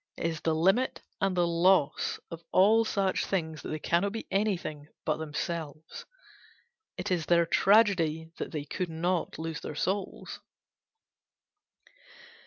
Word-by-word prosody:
It - - -4
is 160 -2 -2
the 160 -1 +1
limit 195 +11 +2 0.2
and 190 -1 +1
the 175 - +4
loss 170 -2 +2
of 165 0 -7
all 215 +4 +5
such 195 -4 0
things 160 -5 -2
that - - -7
they 155 - -2
cannot 175 +6 0
be 225 - -5
anything 175 -8 -1 0.2
but - - +1
themselves: 160 0 -5 0.9
it - - -4
is 170 -4 0
their 170 -1 +4
tragedy 170 -6 +3
that - - -4
they 150 -3 -4
could 175 +4 -3
not 170 +2 -1
lose 160 0 -4
their 150 - -6
souls. 190 +6 -3
170 Hz, 140 wpm, -29 LUFS, 160-195 Hz, 0.9 s, all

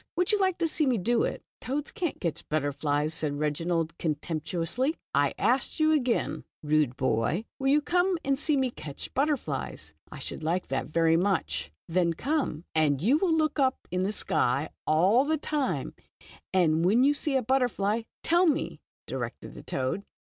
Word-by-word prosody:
Would 360 +3 +2
you 420 - +2
like 375 -2 +2
to 335 -1 +1
see 305 -2 +1
me 250 -3 +2
do 230 +5 +1
it? - - -2
" - - -68
"Toads 280 +4 -3
can't 365 -9 -3
catch 170 -4 -4
butterflies," 145 0 0
said 150 -3 -1
Reginald, 165 +2 -1
contemptuously. 165 - -1
" - - -74
I - - -7
ask 260 +6 +1
you 310 0 +4
again, 255 -6 0 0.2
rude 150 -4 +2
boy, 130 - 0
will 270 - -1
you 290 +2 +4
come 360 +3 +2
and 275 0 +1
see 300 -1 +2
me 260 -2 +1
catch 145 -10 -8
butterflies?" 160 - -2 0.2
"I 155 - -8
should 140 - -6
like 170 +4 -1
to 135 - -1
very 165 +1 +3
much." 165 - 0 0.2
"Then 170 0 +2
come, 270 - -1
and 150 -3 +2
you 235 - +3
are - - -4
to 385 - +2
look 315 -3 +1
up 260 -1 +1
in 180 +1 0
the 190 +2 0
sky 140 -7 0 0.2
all 185 - +4
the 315 +2 +1
time, 295 -2 -2 0.6
and 165 -3 +3
when 215 +8 +4
you 285 +2 +5
see 290 -1 -1
a 260 - +2
butterfly, 230 -4 +1 0.2
tell 345 +2 +4
me," 300 -2 0 0.2
directed - - -5
the - - -10
toad. 130 +9 -2
200 Hz, 185 wpm, -28 LUFS, -, 0.6 s, you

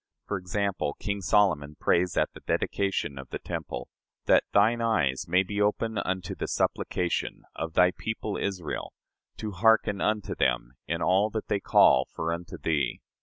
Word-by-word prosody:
For 100 - -2
example, 90 -4 -2
King 100 -1 -3
Solomon 85 -7 +2
prays 90 0 +2
at - - +1
the - - -11
dedication 95 -8 -1
of 65 -1 -9
the - - -4
temple: - - -5 0.4
"That - - +5
thine 115 +4 +4
eyes 80 - +1
may 90 +3 +3
be 100 +2 -3
open 105 +1 +1
unto 95 -1 -2
the - - -4
supplication... 90 -1 -1
of 80 0 -4
thy 90 +1 +5
people 110 +1 -4
Israel, 90 -6 -3 0.4
to 110 - -4
hearken 105 0 +3
unto 105 -1 0
them - - 0
in 85 0 -1
all 95 +4 +3
that 110 0 -5
they 100 - +1
call 65 -8 +5
for 85 +1 -2
unto 85 +1 -6
thee. 75 -3 -1
95 Hz, 165 wpm, -27 LUFS, 85-105 Hz, 0.4 s, That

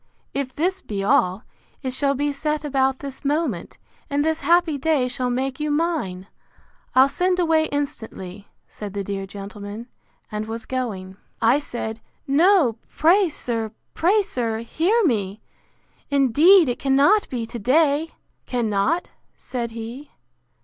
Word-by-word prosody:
If 275 -2 -3
this 375 +5 0
be 200 -2 -4
all, 190 +1 +2 0.4
it 260 -1 -2
shall 280 +1 +1
be 290 +1 0
set 300 +1 -2
about 265 -2 +1
this 275 -2 -8
moment, 285 - -1 0.3
and 290 0 +1
this 320 0 +1
happy 335 -3 +3
day 290 -3 +2
shall 250 0 -1
make 260 +2 -2
you 300 0 -1
mine!—I'll 270 - -1
send 360 +5 0
away 320 -2 +3
instantly, 220 -10 -5 0.2
said 205 -1 -8
the 200 - -2
dear 195 0 -4
gentleman; 205 +2 -8 0.5
and 210 0 -3
was 225 +1 -5
going. 195 -8 -4 0.2
I 235 +5 +4
said, 230 -5 -5 0.3
No, 290 - +4
pray, 360 +4 +4
sir, 230 -6 -3 0.2
pray, 400 +6 +3
sir, 230 - -2
hear 375 - +1
me!—Indeed 275 - +2
it 245 - -2
cannot 280 +10 +3
be 240 -3 -3
to 235 +1 -7
day!—Cannot! 280 - 0 0.3
said 240 -2 -4
he. 230 +5 -8
265 Hz, 130 wpm, -23 LUFS, 225-310 Hz, 0.5 s, I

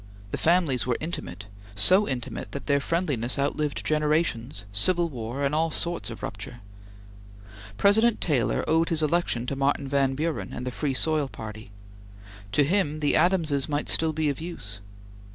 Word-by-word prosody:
The - - -2
families 155 - +2
were 120 - +1
intimate; 105 - -6 0.3
so 185 - +5
intimate 125 -3 -4
that 140 - -5
their 140 -1 +2
friendliness 140 -7 -1
outlived 145 +1 -1
generations, 150 - 0
civil 170 - +2
war, 125 0 -5
and 140 +1 0
all 160 +2 +2
sorts 160 -9 -1
of 115 - -9
rupture. 105 +4 -7 1.2
President 220 - +4
Taylor 140 -8 0
owed 160 +1 +2
his 160 -2 +2
election 155 -6 0
to 140 - -3
Martin 140 +1 0
Van 135 -1 +1
Buren 155 +2 -3
and 125 - -5
the 125 - -3
Free 135 +1 -2
Soil 155 0 +2
Party. 110 -3 -9 0.8
To 145 - +5
him, 155 -1 0
the 145 -1 +2
Adamses 160 -5 +2
might 145 0 -1
still 160 0 +4
be 155 0 -1
of 140 +1 -2
use. 105 - -7
145 Hz, 160 wpm, -26 LUFS, 125-165 Hz, 1.2 s, so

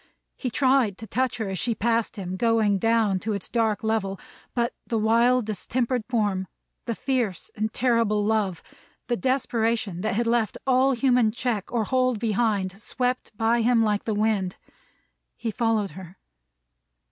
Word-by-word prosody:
He 255 - -3
tried 255 -5 +2
to 225 - -8
touch 250 +3 -1
her 220 -3 -3
as 190 -2 -3
she 235 -2 0
passed 230 +1 0
him, 185 -3 -5
going 215 -1 +2
down 225 -3 +2
to 215 +3 -2
its 200 -2 -4
dark 225 -3 0
level; 215 -3 -1 0.4
but, 235 -1 0
the 230 - 0
wild 230 +3 +3
distempered 235 +4 -1
form, 205 -6 0 0.4
the 230 -2 -2
fierce 250 -8 -2
and 215 +1 -2
terrible 230 -4 +2
love, 210 -5 0 0.4
the 240 - 0
desperation 230 -6 0
that 215 0 -1
had 235 +2 +1
left 230 -2 +1
all 265 +1 +4
human 245 -3 +3
check 235 -3 -2
or 235 -2 +1
hold 255 +1 +1
behind, 210 -3 0
swept 250 +3 -2
by 230 +1 +2
him 230 0 +3
like 210 -2 0
the 220 - -1
wind. 205 -3 0 0.8
He 230 - -3
followed 220 -3 0
her. 185 0 -11
225 Hz, 160 wpm, -25 LUFS, 205-240 Hz, 0.8 s, all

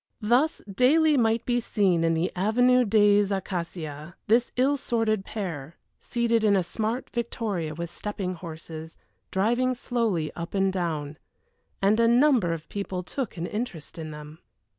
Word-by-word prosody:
Thus, 250 +9 +2
daily 295 +10 +4
might 225 -3 +2
be 245 -1 +1
seen 195 -7 +1
in 165 0 +2
the 165 +2 0
Avenue 245 +6 +3
des 205 -1 +4
Acacias 170 -5 -4
this 235 +3 +3
ill 265 +3 +3
assorted 225 -6 0
pair, 170 -8 -5 0.2
seated 235 -2 0
in 205 -2 +4
a 190 - +2
smart 220 +7 -3
victoria 210 -9 -3
with 170 +1 -5
stepping 195 -1 -4
horses, 160 -1 -9 0.3
driving 240 +6 +1
slowly 225 - -1
up 170 +3 -6
and 195 -1 +2
down. 155 -5 -3 0.6
And 210 +3 +4
a 230 - +5
number 240 - +4
of 165 -1 -5
people 195 -2 -4
took 240 +2 -5
an 170 - -3
interest 180 -7 -5
in 160 -1 -5
them. 150 +1 -10
200 Hz, 150 wpm, -26 LUFS, 170-235 Hz, 0.6 s, a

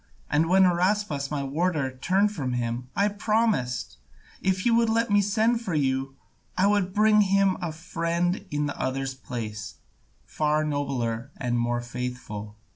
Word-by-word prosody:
And 160 +3 +2
when 190 +1 +6
Araspas, 180 -5 +1
my 145 -2 -2
warder, 150 -1 0
turned 190 +11 +1
from 135 -10 -3
him, 120 +1 -3
I 200 - +3
promised, 210 - 0 0.4
if 190 -1 +1
he 240 - +2
would 230 0 +3
let 230 0 +1
me 205 0 +5
send 220 +4 +1
for 185 -8 -3
you, 135 -1 0 0.4
I 190 - +4
would 200 -2 +2
bring 215 +1 +5
him 195 -1 +3
a 170 -2 -2
friend 170 +2 -1
in 150 0 -1
the 140 - -4
other's 135 0 -2
place, 110 -5 -6 0.5
far 155 0 0
nobler 135 -5 -2
and 120 -2 -1
more 120 0 0
faithful." 120 -4 -6
155 Hz, 155 wpm, -26 LUFS, 130-195 Hz, 0.5 s, when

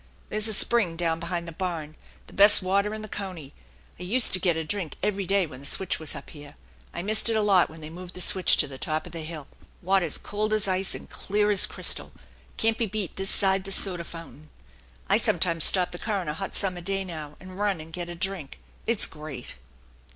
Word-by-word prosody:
There's 215 +1 0
a 220 - +2
spring 210 -7 +3
down 165 -1 0
behind 170 0 -3
the - - -6
barn, 160 -3 -4 0.3
the - - -16
best 205 0 +6
water 200 +3 +1
in 215 - -7
the - - -6
county. 185 -9 -7 0.5
I - - -6
useta 195 -1 +2
get 175 -3 +2
a 160 - -1
drink 175 -3 -2
every 200 -2 -1
day 195 -1 +3
when 130 -5 -10
the 140 - -10
switch 190 +4 0
was 160 -1 -1
up 140 - -9
here. 145 -1 -11 0.4
I 170 - -5
missed 215 +3 +4
it 225 - +1
a 220 - +2
lot 195 -4 +4
when 160 +1 -12
they 155 - -7
moved 180 +1 -9
the 180 - -2
switch 185 0 +5
to - - +5
the 135 -1 -10
top 155 0 -2
of 175 - -10
the 165 -1 -5
hill. 155 -2 -6 0.4
Water's 185 -3 +2
cold 215 +1 -2
as 215 -2 +1
ice 190 0 0
and - - -9
clear 210 +1 0
as 200 - +3
crystal - - -2 0.5
can't 225 0 +1
be 230 - +1
beat 200 -3 -4
this 195 0 -2
side 190 -1 +3
the 195 - -7
soda 185 -3 0
fountain. 160 -3 -11 0.6
I - - +4
sometimes 165 -3 +3
stop 180 -2 +5
the 175 - -8
car 215 -2 -1
on 180 - -5
a 150 - -1
hot 190 +5 -5
summer 185 -3 0
day 195 +2 -2
now, 155 -4 -8
and 185 +1 -11
run 205 -4 0
and 160 +1 -10
get 175 0 -5
a 175 - -6
drink 180 -5 -2 0.3
it's 230 -2 +3
great." 150 -5 -9
185 Hz, 230 wpm, -26 LUFS, 160-200 Hz, 0.6 s, best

